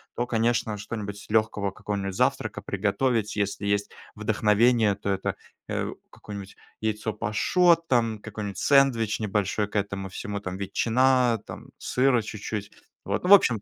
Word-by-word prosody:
то, 120 - -1
конечно, 115 -2 0
что-нибудь 105 -1 -6
легкого, 110 -2 +1
какого-нибудь 95 -1 -4
завтрака - - 0
приготовить. 105 +3 0
Если 100 0 -2
есть 100 0 0 0.2
вдохновение, 110 0 +3
то 100 0 -5
это, 95 0 -1 0.3
э, - - -1 0.2
какое-нибудь 100 -2 -9 0.3
яйцо 110 0 -1
пашот, 165 - +2
там 115 -3 +2
какой-нибудь 105 -2 -6
сэндвич 130 -6 +3
небольшой 105 -1 0
к 105 - -16
этому 100 -1 -2
всему, 100 +2 -5
там 95 -2 -5
ветчина, 120 +4 +2
там - - -9
сыра 125 -2 +2
чуть-чуть. 105 -1 -5 0.3
Вот, 100 +1 -2
ну 180 - -1
в - - +10
общем. 120 - +5
105 Hz, 140 wpm, -26 LUFS, 100-120 Hz, 0.3 s, в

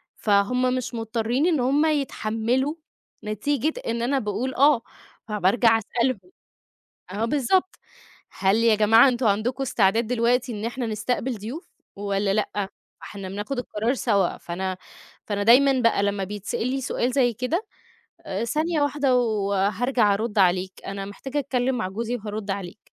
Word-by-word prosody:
فهّم 250 +5 +2
مش 255 -1 -4
مضطرين 230 +5 -1
إن 320 -6 +2
هّم 280 +5 +2
يتحملوا 260 -2 0 0.5
نتيجة 275 +8 -1
إن 230 0 -1
أنا 270 +3 +1
باقول 225 +3 -3
آه، 280 -2 +5 0.5
فبارجع 220 +3 +3
أسألهم. 235 +2 -1 0.9
آه، 210 +3 -1
بالضبط. 295 +9 +1 0.6
هل 195 +1 +1
يا 230 -1 +4
جماعة 225 +4 +6
أنتم 245 0 -1
عندكم 235 +6 0
استعداد 220 -1 +2
دلوقتي 245 +1 +1
إن 215 0 -4
إحنا 240 +1 -3
نستقبل 225 +3 -2
ضيوف 240 - -8 0.3
والّا 200 0 -1
لأ؟ 205 -2 -1 0.3
فإحنا 195 -2 -8
بناخد 205 +7 -4
القرار 230 +1 -1
سوا، 210 -7 +1
فأنا 185 +2 -4 0.5
فأنا 205 -1 -2
دايمًا 260 +4 +5
بقى 230 -3 +3
لمّا 200 -1 0
بيتسأل 210 +4 -3
لي 265 +1 -2
سؤال 250 -1 -1
زي 245 -3 +2
كده، 300 - -2 0.6
آآ، 195 +4 -2
ثانية 310 +6 0
واحدة 285 -3 +2
وهارجع 210 0 +1
أرد 215 0 -2
عليك، 185 0 +3
أنا 195 0 -4
محتاجة 265 +8 -5
أتكلم 260 -2 0
مع 185 -4 -2
جوزي 230 +5 -3
وهارُدّ 210 -1 -5
عليك. 195 +1 -5
230 Hz, 145 wpm, -24 LUFS, 205-255 Hz, 0.9 s, جماعة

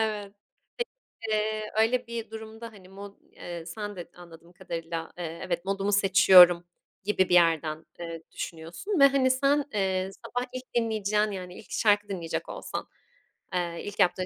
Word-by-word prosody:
Evet. 210 -2 -2 0.9
Peki 215 -1 0 0.4
öyle 245 +2 +2
bir 230 -1 -5
durumda 220 +1 -8
hani 190 -3 -16
mod 200 +1 -10 0.2
eee, 170 -2 -8
sen 205 +4 -6
de 175 -1 -8
anladığım 170 0 -14
kadarıyla, 165 -3 -5
eee, 165 -1 -5
evet 175 0 -2
modumu 195 +1 -1
seçiyorum 185 -3 +7 0.4
gibi 190 -2 +1
bir - - +1
yerden, 165 -2 +3
eee, 165 -1 -6
düşünüyorsun 170 - -4
ve, 275 - +9
hani, 270 -2 +3
sen, 280 +2 +2
eee, 190 -2 0 0.2
sabah 245 +1 -2
ilk 255 0 -5
dinleyeceğin 215 -2 +1
yani, 180 -2 -7
ilk - - -15
şarkı 205 -1 +2
dinleyecek 170 -4 -4
olsan, - - -5 0.7
eee, 175 -2 -2
ilk 205 0 -7
yaptığın 185 -1 +3
195 Hz, 150 wpm, -28 LUFS, 175-220 Hz, 0.9 s, ve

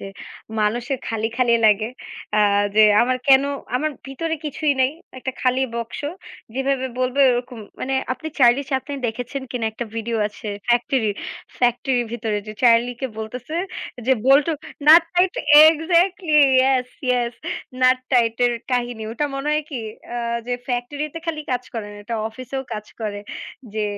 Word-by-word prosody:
যে - - -7 0.5
মানুষের 240 +5 0
খালি, 225 -1 -1
খালি 245 -2 +3
লাগে। 215 +1 +3 0.5
আ - - +4 0.4
যে 215 - +8 0.2
আমার 255 +1 +1
কেনো 275 0 +6 0.3
আমার 310 +4 -1 0.2
ভিতরে 320 +5 -3
কিছুই 300 0 0
নাই। 260 - +4 0.3
একটা 260 +1 -4
খালি 255 +1 +2
বক্স, 235 -1 -5 0.5
যেভাবে 270 0 0
বলবে 255 +2 0
ওরকম 245 0 -4 0.2
মানে 270 +1 -1 0.2
আপনি 315 +5 -6
চার্লি 250 +1 +5
চ্যাপলিন 275 +1 -2
দেখেছেন 245 +4 -4
কিনা 240 -3 -2
একটা 240 - -5
ভিডিও 230 +1 -2
আছে 210 +1 -9 0.2
ফ্যাক্টরির। 240 -2 +2 0.4
ফ্যাক্টরির 245 0 +1
ভিতরে 220 -3 -2
যে 215 - -6
চার্লিকে 240 +2 +3
বলতেছে 245 +7 -6 0.5
যে, 265 - +5
"bolt 275 +1 +6 0.4
nut 330 +2 +10
tight" 360 +1 +3 0.4
exactly 335 +1 +2 0.2
yes, 260 -1 +3 0.2
yes 245 -1 +1 0.5
nut 255 0 +5
tight 230 -2 +3
এর 240 - +1 0.2
কাহিনী। 240 -2 -1
ওটা 295 +6 -1
মনে 275 +2 -3
হয় 305 0 +1
কি 260 -5 -4 0.3
আ - - -2 0.3
যে 245 - -1
ফ্যাক্টরিতে 285 +6 -3
খালি 320 -2 -2
কাজ 250 - -1
করে 225 -3 -4
না। - - -11
এটা 230 +2 -4
অফিসেও 255 +4 -6
কাজ 210 -1 -5
করে। 205 -2 -3 0.5
যে 215 -1 0
250 Hz, 155 wpm, -22 LUFS, 235-275 Hz, 0.5 s, nut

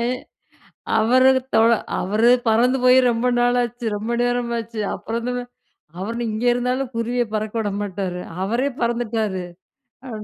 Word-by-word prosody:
அ, - - 0 0.9
அவரு 255 +4 +5 0.2
தொழ 225 +1 +5 0.3
அவரு 215 +5 +3 0.2
பறந்து 245 +4 +3
போய் 255 +1 +7
ரொம்ப 235 +1 -1
நாளாச்சு. 245 0 0
ரொம்ப 220 +3 -3
நேரமாச்சு. 235 -2 -2
அப்புறம் 230 +1 -4
வந்து 250 +1 -2
வ - - -3 0.6
அவரு 210 +5 -4
நீ - - -1
இங்கே 225 +3 0
இருந்தாலும் 250 +1 -1
குருவிய 240 +1 0
பறக்க 215 0 -2
விட 205 - -1
மாட்டாரு! 190 -3 -4 0.2
அவரே 235 +8 0
பறந்துட்டாரு 225 -5 -1 0.6
அ - - -7
235 Hz, 140 wpm, -21 LUFS, 215-245 Hz, 0.9 s, போய்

